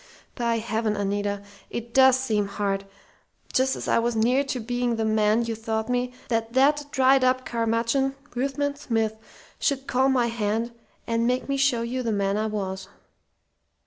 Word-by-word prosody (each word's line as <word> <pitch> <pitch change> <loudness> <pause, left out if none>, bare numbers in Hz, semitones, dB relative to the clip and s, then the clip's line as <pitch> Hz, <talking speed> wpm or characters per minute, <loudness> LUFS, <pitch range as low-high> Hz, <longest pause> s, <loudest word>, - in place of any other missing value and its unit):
"By 235 -2 0
heaven, 220 -1 -1
Anita, 205 0 -2 0.3
it 235 0 -6
does 265 -1 +6
seem 215 -6 0
hard, 200 -1 -2 0.7
just 265 +1 +2
as - - -6
I - - +3
was 235 0 0
near 245 +5 +3
to 265 -2 -3
being 245 +1 -1
the 225 0 -1
man 215 +1 +3
you 230 - -2
thought 220 0 -3
me, 250 0 0 0.2
that 230 -1 -1
that 290 +3 +3
dried 265 -1 +4
up 255 0 +2
curmudgeon 230 +4 0 0.2
Ruthven 275 +3 -1
Smith 225 -6 -1 0.4
should 275 -2 0
call 265 +1 +2
my 255 -3 +3
hand 230 0 -1 0.3
and 230 0 0
make 250 +1 0
me 275 - 0
show 270 -4 +2
you 250 +2 -2
the 230 -2 -1
man 200 -1 0
I 215 +1 0
was! 195 -3 -4
235 Hz, 170 wpm, -25 LUFS, 220-260 Hz, 0.7 s, does